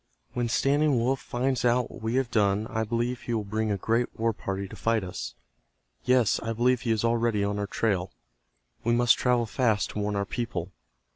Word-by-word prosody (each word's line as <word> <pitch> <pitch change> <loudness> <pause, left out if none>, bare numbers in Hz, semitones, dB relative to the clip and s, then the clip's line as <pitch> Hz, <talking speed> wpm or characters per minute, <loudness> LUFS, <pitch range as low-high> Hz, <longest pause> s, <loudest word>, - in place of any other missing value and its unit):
"When 120 -2 -1
Standing 140 +3 +2
Wolf 125 +3 +1
finds 125 0 -1
out 120 0 +2
what - - -11
we 110 +2 -1
have 130 -2 0
done 105 -1 +2
I 110 0 0
believe 120 +3 -1
he 120 - -2
will 110 - -1
bring 110 +2 -2
a 100 - 0
great 115 +5 +1
war 115 0 +2
party 100 -2 -4
to - - -10
fight 115 -2 +1
us. 75 -10 -6 0.7
Yes, 125 -4 +3
I 115 0 -3
believe 125 +2 +2
he 115 - -1
is 110 0 +1
already 115 -3 +1
on 100 0 -1
our 100 - -2
trail. 95 -4 -1 0.7
We 120 - +2
must 120 0 +5
travel 125 -2 +2
fast 110 -2 +1
to - - -4
warn 105 0 -1
our 100 0 0
people." 95 -6 -4
115 Hz, 205 wpm, -27 LUFS, 105-120 Hz, 0.7 s, must